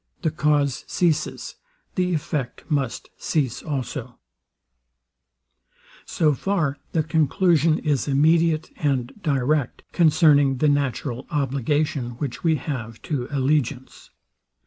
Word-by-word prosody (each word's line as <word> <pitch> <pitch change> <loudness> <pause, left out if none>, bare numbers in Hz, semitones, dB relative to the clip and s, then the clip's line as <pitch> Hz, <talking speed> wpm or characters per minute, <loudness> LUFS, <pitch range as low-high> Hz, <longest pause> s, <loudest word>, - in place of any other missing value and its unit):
The 160 - +1
cause 150 -4 +1
ceases; 170 -4 -1 0.4
the 180 -2 0
effect 140 -4 -3
must 140 -5 -2
cease 130 -6 -1
also. 140 -6 -5 1.9
So 155 -3 +2
far 155 -4 -1
the 160 - +1
conclusion 160 +1 +2
is 145 -3 -1
immediate 160 +3 +2
and 135 -5 -1
direct, 140 - 0
concerning 150 -5 +4
the 150 +3 +3
natural 140 -3 -1
obligation 140 -3 -1
which 135 -2 -5
we 165 -2 +3
have 125 -6 -5
to 130 -5 -2
allegiance. 140 -2 -1
145 Hz, 100 wpm, -23 LUFS, 135-155 Hz, 1.9 s, concerning